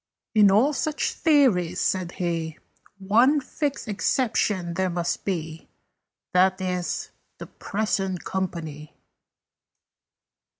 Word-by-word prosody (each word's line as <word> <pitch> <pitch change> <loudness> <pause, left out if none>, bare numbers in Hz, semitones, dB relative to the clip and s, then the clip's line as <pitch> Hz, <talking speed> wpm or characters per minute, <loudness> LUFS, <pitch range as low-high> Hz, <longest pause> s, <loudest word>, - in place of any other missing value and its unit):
"In 210 -2 +6
all 230 +10 +4
such 305 +1 -1
theories," 215 - +3
said 185 -2 -1
he, 165 -3 -3 0.4
"One 235 +10 +4
fixed 280 -1 -3
exception 205 -4 0
there 185 +2 0
must 175 -1 -2
be. 165 -4 -4 0.6
That 185 +1 +4
is, 180 -1 -3 0.3
the - - -8
Present 195 -3 -2
Company." 160 -5 -4
190 Hz, 95 wpm, -25 LUFS, 175-220 Hz, 0.6 s, In